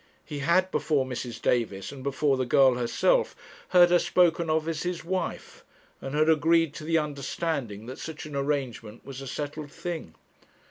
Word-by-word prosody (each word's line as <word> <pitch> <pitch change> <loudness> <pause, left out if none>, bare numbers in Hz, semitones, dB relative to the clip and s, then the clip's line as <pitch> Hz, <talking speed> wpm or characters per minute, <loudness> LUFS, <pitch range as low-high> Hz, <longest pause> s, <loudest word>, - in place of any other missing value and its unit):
He 150 -3 -6
had, 180 +6 +2
before 145 -4 +1
Mrs. 125 -2 -5
Davis, 110 -5 0
and 140 -2 -9
before 140 +1 +1
the 130 - 0
girl 135 0 +5
herself, 125 - +1 0.3
heard 175 -1 +6
her 175 - +6
spoken 170 -2 +2
of 155 0 +1
as 160 -2 -2
his 175 -2 -3
wife, 185 +2 -4 0.4
and 135 +2 -5
had 155 +1 +3
agreed 160 0 +3
to 155 - -8
the 165 +1 +2
understanding 140 -6 -3
that 130 +2 -8
such 160 -1 -7
an 150 -2 -8
arrangement 135 -6 -3
was 135 -1 -8
a 135 - -7
settled 145 +2 -5
thing. 165 - -6
150 Hz, 175 wpm, -27 LUFS, 130-165 Hz, 0.4 s, heard